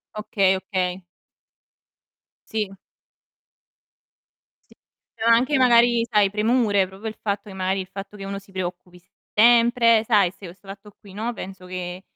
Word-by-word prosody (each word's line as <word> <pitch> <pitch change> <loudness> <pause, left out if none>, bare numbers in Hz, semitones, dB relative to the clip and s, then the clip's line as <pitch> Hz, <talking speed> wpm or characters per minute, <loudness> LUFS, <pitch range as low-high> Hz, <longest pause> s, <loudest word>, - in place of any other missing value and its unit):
Okay, 195 -3 +1
okay. 185 -1 -3 1.5
Sì. 210 -3 -2 2.0
Sì. - - -20 0.4
Però 225 - -3
anche 255 +5 +4
magari 235 -2 +4
sai 210 -3 +3
premure, 210 -2 +1
proprio 195 +4 -9
il 220 - -6
fatto 200 0 -3
che - - -10
magari 190 +1 -1
il 185 - -10
fatto 200 +1 -9
che 195 - -8
uno 195 0 -5
si 200 0 -21
preoccupi 180 -1 -6 0.3
sempre, 230 0 +5
sai 205 -6 +3
se 190 -3 -12
o - - -11
'sto 195 +1 -24
fatto 200 +1 -11
qui, 195 -2 -15
no, 225 +4 -3
penso 190 -3 -9
che 180 0 -6
200 Hz, 150 wpm, -23 LUFS, 190-225 Hz, 2.0 s, sempre